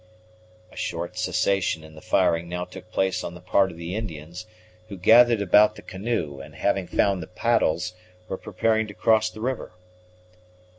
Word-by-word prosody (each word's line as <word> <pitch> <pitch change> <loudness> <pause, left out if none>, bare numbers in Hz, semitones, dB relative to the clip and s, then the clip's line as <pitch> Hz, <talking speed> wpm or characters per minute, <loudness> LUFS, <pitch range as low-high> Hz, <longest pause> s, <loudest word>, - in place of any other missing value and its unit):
A - - -17
short 85 +1 -4
cessation 95 -5 0
in 80 0 -13
the 80 - -13
firing 85 +1 +1
now 90 0 -3
took - - -12
place 95 -1 0
on 85 - -6
the - - -10
part 95 +2 +2
of 85 - -11
the 85 +1 -6
Indians, 85 -2 -6 0.4
who 100 - -7
gathered 115 +3 +6
about 105 +3 +5
the - - -12
canoe, 95 -8 -3
and, - - -12
having 100 -3 0
found 100 -3 +1
the 80 - -7
paddles, 90 -4 0 0.3
were - - -3
preparing 110 +2 0
to 100 - -10
cross 110 +3 +3
the 110 - -11
river. 125 -5 -3
95 Hz, 170 wpm, -25 LUFS, 85-110 Hz, 0.4 s, gathered